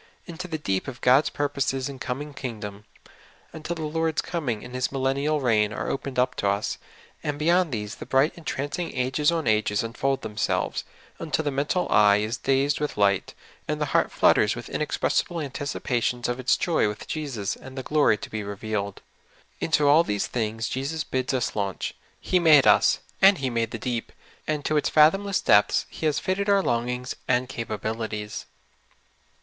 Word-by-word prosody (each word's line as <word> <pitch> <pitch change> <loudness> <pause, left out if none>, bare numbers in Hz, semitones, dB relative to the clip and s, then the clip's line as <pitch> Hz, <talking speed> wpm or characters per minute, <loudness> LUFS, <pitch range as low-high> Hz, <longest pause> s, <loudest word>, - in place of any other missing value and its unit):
Into 175 +1 -7
the 160 -3 -3
deep 95 -9 -2
of 125 -3 -7
God's 130 +4 +5
purposes 140 -2 -1
and 135 -2 -8
coming 145 +4 -4
kingdom, 105 -6 -6 0.7
until 160 +2 -5
the 160 - -5
I<ord's 160 0 0
coming 135 -11 -3
and 125 - -10
His 130 0 -1
millennial 140 +3 0
reign 110 -5 +2
are - - -3
opened 135 -1 -4
up 125 +1 +2
to 100 - 0
us; 100 +1 -1 0.4
and 145 -1 -3
beyond 170 +2 +2
these 105 -3 -4
the - - -9
bright 135 +4 +3
entrancing 155 0 -4
ages 130 +5 +2
on 165 -2 -1
ages 105 -1 +2
unfold 135 +4 -1
themselves, 105 -1 -1 0.3
until 160 -1 -1
the 145 - +1
mental 145 +7 0
eye 100 -1 +6
is 110 +3 -2
dazed 135 +2 +1
with 150 -5 -3
light, 100 -2 +1 0.3
and - - -2
the - - +1
heart - - +3
flutters - - +4
with - - -8
inexpressi - - 0
ble 170 - -5
anticipations 130 -4 -2
of 120 +1 -2
its 130 - +2
joy 165 -10 +1
with 105 +1 -6
Jesus 130 -10 -3
and 135 0 -12
the 130 - -3
glory 150 -8 +3
to - - -8
be 110 - -3
revealed. 100 0 -4 0.6
Into 150 -3 +2
all 150 +4 +6
these 105 -9 -1
things 115 -1 -2
Jesus 140 +4 -2
bids 130 0 -2
us 130 -3 -1
launch. 100 -3 -2 0.3
He 180 - +1
made 155 -5 +6
us, - - +5 0.2
and 195 +1 +7
He 135 -3 -2
made 115 -1 0
the 115 - -5
deep, 120 0 -3 0.4
and 150 -2 -2
to 155 - +1
its 150 - +1
fath 155 +1 +6
omless 200 0 -2
depths 105 0 +4
He 160 - -2
has 150 - +1
fitted 200 +2 -1
our 200 -1 +4
longings 125 0 -1
and 125 0 +2
capabil 110 -3 -4
ities. 105 -1 -5
130 Hz, 185 wpm, -25 LUFS, 110-150 Hz, 0.7 s, and